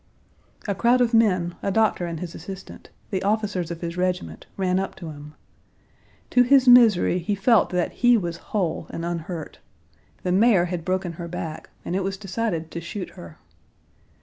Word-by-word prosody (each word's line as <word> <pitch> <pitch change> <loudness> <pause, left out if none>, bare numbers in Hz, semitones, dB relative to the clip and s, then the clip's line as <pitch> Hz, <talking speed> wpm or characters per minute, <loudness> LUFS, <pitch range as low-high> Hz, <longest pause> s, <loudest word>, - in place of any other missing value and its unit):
A 200 - +1
crowd 235 +5 +3
of 245 -1 +2
men, 185 -6 +3
a - - -1
doctor 200 -3 +1
and 165 -2 -5
his 175 -1 -6
assistant, 190 +3 -10 0.2
the 190 -2 -1
officers 200 -4 -1
of 170 -1 -6
his 170 0 -5
regiment, 180 0 -2
ran 185 -1 +1
up 195 - -4
to 165 -4 -8
him. 150 +1 -11 1.0
To 250 - +5
his 260 +1 +5
misery 225 -7 +6
he 190 +4 -1
felt 220 +3 +3
that 180 -1 -1
he 245 -1 +4
was 170 -4 -3
whole 185 -7 -1
and 165 - -5
unhurt. 170 -1 -5 0.6
The 180 - 0
mare 195 -2 +4
had 175 -2 -4
broken 185 0 -1
her 170 +1 -7
back, 165 -2 -6 0.2
and 180 - -2
it 195 - 0
was 195 0 -3
decided 190 -5 -3
to 170 - -5
shoot 185 +2 -6
her. 85 -2 -12
185 Hz, 175 wpm, -24 LUFS, 170-210 Hz, 1.0 s, misery